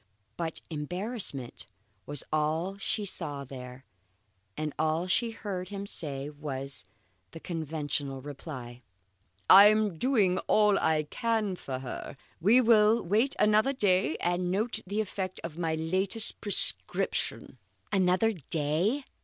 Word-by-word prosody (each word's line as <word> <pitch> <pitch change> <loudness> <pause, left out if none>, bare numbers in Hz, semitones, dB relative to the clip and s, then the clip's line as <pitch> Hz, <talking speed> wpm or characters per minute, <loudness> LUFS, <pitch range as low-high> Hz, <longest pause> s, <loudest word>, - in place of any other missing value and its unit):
But 165 -2 -4
embarrassment 165 - -3 0.4
was 145 -2 -3
all 160 +5 -1
she 210 0 -2
saw 150 -7 -3
there, 125 -1 -10 0.7
and 155 -2 -3
all 160 +2 0
she 230 +6 +1
heard 195 -5 -6
him 200 -1 -6
say 140 -7 -3
was 140 -6 -4 0.5
the - - -8
conventional 150 -4 -4
reply: 130 -3 -9 0.7
"I 200 +2 +10
am 210 -5 +1
doing 210 -9 +2
all 210 -2 +4
I 155 -1 +1
can 215 +4 -2
for 135 -7 -6
her. 130 +1 -7 0.2
We 210 +9 +5
will 225 -1 +4
wait 220 +10 +1
another 215 +6 +3
day 185 - +2
and 175 +1 -1
note 210 +6 0
the 205 +3 -1
effect 185 -2 -5
of 165 0 -7
my 165 -2 -1
latest 185 +7 +4
prescription." 205 - +2 0.3
Another 190 +3 +2
day! 165 - -1
180 Hz, 125 wpm, -28 LUFS, 150-210 Hz, 0.7 s, I